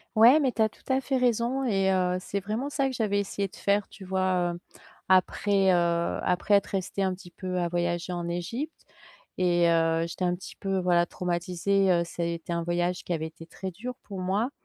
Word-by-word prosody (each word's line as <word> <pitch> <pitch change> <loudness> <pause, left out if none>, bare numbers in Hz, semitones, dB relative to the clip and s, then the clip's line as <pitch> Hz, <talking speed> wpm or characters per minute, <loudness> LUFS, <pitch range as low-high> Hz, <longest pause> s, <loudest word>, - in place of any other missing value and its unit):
Ouais, 235 +7 +8
mais 270 -4 +2
tu 225 - -2
as 220 - +4
tout - - -24
à 265 - +2
fait 265 0 0
raison 245 +2 +1
et 195 -6 +2
heu, 180 -1 +1
c'est 195 +2 -3
vraiment 215 +8 -3
ça 275 -1 0
que 260 - -3
j'avais 210 -4 0
essayé 200 0 -2
de - - -16
faire, 200 0 +1
tu 195 - -12
vois, 185 -2 +1
heu, 175 - -8 0.5
après, 190 +1 +3
heu 170 -1 +1
après 180 +3 +1
être 200 - +4
restée 195 0 -3
un 190 -1 +1
petit 180 -1 -14
peu 185 0 -4
à 175 - +1
voyager 175 +1 -1
en 175 -1 -3
Égypte 230 - -4 0.5
et 175 -1 +3
heu, 165 0 +2
j'étais 175 +2 -5
un 175 0 +1
petit 180 - -10
peu, 195 -1 -2
voilà 175 -1 +3
traumatisée, 180 +3 0
heu, 170 -1 +3
ça, 170 0 -4
était 170 0 -3
un 170 - -1
voyage 175 +1 -1
qui - - -7
avait 160 -1 -2
été 165 +1 -13
très 190 +3 -6
dur 240 +8 -6
pour 195 -2 -7
moi. 200 +7 0
185 Hz, 215 wpm, -27 LUFS, 175-205 Hz, 0.5 s, Ouais